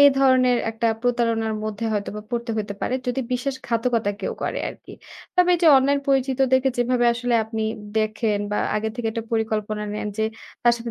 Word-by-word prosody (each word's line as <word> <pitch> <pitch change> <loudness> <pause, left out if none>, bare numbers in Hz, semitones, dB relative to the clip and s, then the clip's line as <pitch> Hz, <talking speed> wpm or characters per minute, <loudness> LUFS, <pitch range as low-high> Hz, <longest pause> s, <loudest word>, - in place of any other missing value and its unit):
এই 285 - +10
ধরনের 255 -2 +4
একটা 225 +1 -1 0.2
প্রতারণার 230 -3 +1
মধ্যে 215 +1 -4
হয়তোবা 210 0 -3
পড়তে 235 0 -2
হইতে 205 -1 -3
পারে, 255 - -1
যদি 250 +2 0
বিশ্বাসঘাতকতা 245 -4 -1
কেউ - - -2
করে - - -2
আরকি। - - -11 0.4
তবে 360 0 +5
এইযে 345 -1 +2
অনলাইন 280 +2 +3
পরিচিতদেরকে 265 -1 +3
যেভাবে 245 0 +2
আসলে 245 0 -1
আপনি 220 0 -4 0.4
দেখেন 215 -1 0
বা 210 - 0 0.2
আগে 215 +1 -1
থেকে 240 -2 -3
একটা 230 0 -4
পরিকল্পনা 215 -1 -1
নেন 210 0 -3
যে, 220 - +2 0.4
তার 240 - +5
সাথে 235 0 -6
235 Hz, 170 wpm, -23 LUFS, 220-255 Hz, 0.4 s, এই